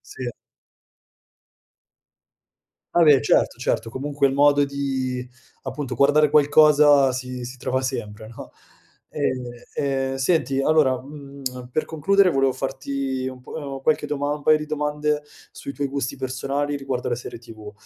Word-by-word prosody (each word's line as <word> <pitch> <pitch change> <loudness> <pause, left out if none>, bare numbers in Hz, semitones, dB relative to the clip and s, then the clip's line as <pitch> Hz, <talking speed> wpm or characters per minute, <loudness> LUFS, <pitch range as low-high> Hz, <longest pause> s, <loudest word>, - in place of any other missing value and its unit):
Sì. 125 -2 -4 2.6
Vabbè, 150 -6 +6
certo, - - +2
certo, - - -1
comunque, 140 +3 0
il 135 - -2
modo 145 0 +4
di, 135 -3 -3 0.4
appunto, 135 -4 -5
guardare 145 +3 +4
qualcosa 145 -2 +5
si 125 -1 -5
si 125 +1 -9
trova 130 +2 -1
sempre, 110 -4 -5
no? 115 - -11 0.6
Ehm, 130 -1 -2 0.3
ehm, 135 -1 -1
senti, 135 -2 +1
allora, 135 -5 +3
mhmm, 135 -3 -8
per 155 - -1
concludere 195 +5 +3
volevo 135 -3 +2
farti 135 0 -3
un 130 - -10
po' - - -13
uhm, 140 -3 -6
qualche 150 0 +1
doma 145 0 -1
un 150 -1 -7
paio 155 0 +5
di 150 - -6
domande 150 0 -1 0.3
sui 140 - -7
tuoi 140 0 -3
gusti 135 -1 -3
personali 140 +3 -2
riguardo 135 -3 -3
le 120 - 0
serie 120 -1 -8
TV. 110 -3 -11
140 Hz, 140 wpm, -23 LUFS, 130-145 Hz, 2.6 s, Vabbè